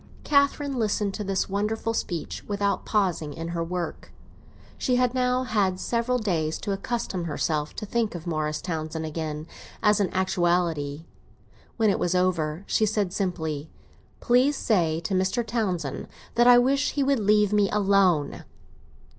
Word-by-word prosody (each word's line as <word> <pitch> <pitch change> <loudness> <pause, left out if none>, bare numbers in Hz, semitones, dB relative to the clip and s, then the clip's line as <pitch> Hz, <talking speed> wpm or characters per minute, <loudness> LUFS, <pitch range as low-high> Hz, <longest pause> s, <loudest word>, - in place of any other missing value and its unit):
Catherine 280 -1 +2
listened 210 -2 0
to 210 - -4
this 195 -1 -1
wonderful 210 +3 -1
speech 175 -7 -4
without 200 -1 -1
pausing 180 -8 0
in 165 +1 -5
her 170 -1 -2
work; 175 -1 -5 0.6
she 250 - 0
had 250 -1 +2
now 250 0 +1
had 200 -7 0
several 235 +5 0
days 165 -9 -1
to 205 - -3
accustom 195 -3 -3
herself 150 -1 -2
to 215 - -5
think 225 -2 -1
of 170 0 -7
Morris 155 -2 -2
Townsend 160 -2 -3
again 155 -1 -4 0.4
as 210 -1 +4
an 195 -3 +1
actuality. 170 -5 0 0.7
When 220 -3 +3
it - - -1
was 175 +1 0
over 175 -2 0
she 215 - +2
said 205 -3 0
simply, 160 -6 -2 0.5
"Please 255 +4 +3
say 165 -7 +1
to 170 - -3
Mr. 190 +5 +1
Townsend 190 - -2 0.3
that 240 +1 +4
I 245 0 +9
wish 275 +3 +2
he 285 - +1
would 275 -2 +2
leave 210 0 +3
me 205 -1 +3
alone." 195 -7 +2
195 Hz, 155 wpm, -26 LUFS, 165-225 Hz, 0.7 s, I